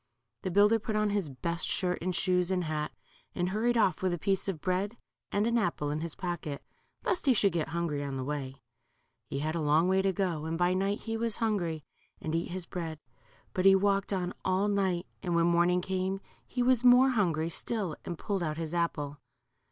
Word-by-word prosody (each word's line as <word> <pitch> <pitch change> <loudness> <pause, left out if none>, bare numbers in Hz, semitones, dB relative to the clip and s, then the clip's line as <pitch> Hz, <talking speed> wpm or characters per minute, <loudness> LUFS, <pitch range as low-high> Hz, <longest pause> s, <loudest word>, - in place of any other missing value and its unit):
The 190 - -2
builder 205 +4 +5
put 215 0 -3
on 215 -1 +2
his 200 -7 0
best 170 +6 -3
shirt 180 -1 0
and 180 +1 -1
shoes 180 -1 +2
and 185 -1 +1
hat, 155 -2 -2 0.4
and 180 0 0
hurried 230 +5 +1
off 195 -5 +2
with 185 -2 +1
a - - -6
piece 195 +4 0
of 190 -5 -2
bread 190 +7 -1 0.3
and 205 +1 +1
an 235 +1 +2
apple 155 -7 -1
in 150 +1 -2
his 165 -2 -4
pocket, 175 -5 -4 0.4
lest 360 -6 0
he 260 - +6
should 200 -2 +3
get 165 -2 -1
hungry 160 -3 -2
on 140 -1 -3
the 130 - -3
way. 135 -1 -5 0.7
He - - -3
had 155 +1 -1
a 165 - -1
long 155 +3 +3
way 190 +1 +3
to 195 0 +2
go, 175 -5 -1
and 165 +1 -2
by 175 +1 +3
night 195 +3 0
he 225 0 -3
was 230 -1 -1
hungry 175 -9 -1 0.4
and 155 - -4
eat 165 +1 -1
his 180 0 -4
bread. 165 -3 -5 0.6
But 185 - 0
he 195 0 +8
walked 195 0 +2
on 180 -2 -1
all 190 +2 +2
night 190 -3 +1 0.2
and 175 -3 -1
when 170 0 +4
morn 170 0 +4
ing 180 0 +2
came 190 +1 -1 0.3
he 245 - -1
was 250 -1 +3
more 250 +2 +7
hungry 170 -8 +1
still, 190 -1 -2
and 175 - -5
pulled 195 +1 -2
out 155 -2 -2
his 165 0 -4
apple. 150 -4 -1
180 Hz, 215 wpm, -30 LUFS, 165-200 Hz, 0.7 s, he